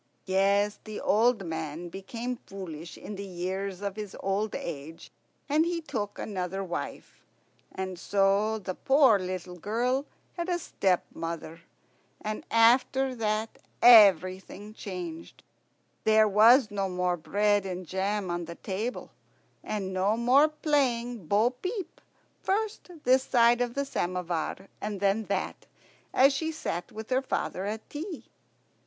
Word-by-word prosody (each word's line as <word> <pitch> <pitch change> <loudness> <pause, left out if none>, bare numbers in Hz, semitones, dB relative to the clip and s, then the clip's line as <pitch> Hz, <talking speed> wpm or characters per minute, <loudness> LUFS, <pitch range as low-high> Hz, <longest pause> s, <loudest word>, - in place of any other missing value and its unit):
Yes, 200 +2 +2
the 215 -1 -6
old 225 -1 +2
man 160 +1 -5
became 230 +7 -5
foolish 170 -4 -8
in 205 - -8
the 200 - -5
years 190 +2 -4
of 200 -1 -3
his 210 -2 -7
old 195 +2 -1
age, 160 0 -7 0.4
and 300 +2 +3
he 340 0 -1
took 210 -10 -4
another 190 -1 -3
wife. 175 -2 -6 0.5
And 190 -2 -5
so 200 +3 +2
the 190 -3 -5
poor 265 -2 +4
little 180 -1 -5
girl 245 - 0 0.3
had 345 +1 -2
a 350 - +1
stepmother. 170 - -2 0.6
And 215 0 -4
after 255 +3 +4
that 220 -1 -2 0.2
everything 200 -2 +6
changed. 180 -6 -7 0.6
There 220 0 +5
was 220 +3 +6
no 195 -2 -1
more 180 -1 0
bread 205 +4 +1
and 185 0 -5
jam 190 +1 -1
on 175 0 -2
the 170 +1 -8
table, 215 +7 -4 0.5
and 195 -3 -3
no 195 +4 +1
more 255 +6 +5
playing 245 - 0
bo 215 +7 +3
peep, 370 - -6 0.4
first 420 0 -1
this 260 +1 +5
side 240 -1 +4
of 240 -1 -1
the 280 0 0
samovar 180 - -3
and 205 -1 -3
then 200 +3 +1
that, 195 -1 -3 0.4
as 270 +2 +5
she 320 +4 -1
sat 175 - -4
with 220 +3 -8
her 255 +1 +3
father 195 -7 -2
at 215 +2 -4
tea. 325 +3 -6
205 Hz, 135 wpm, -28 LUFS, 185-245 Hz, 0.6 s, everything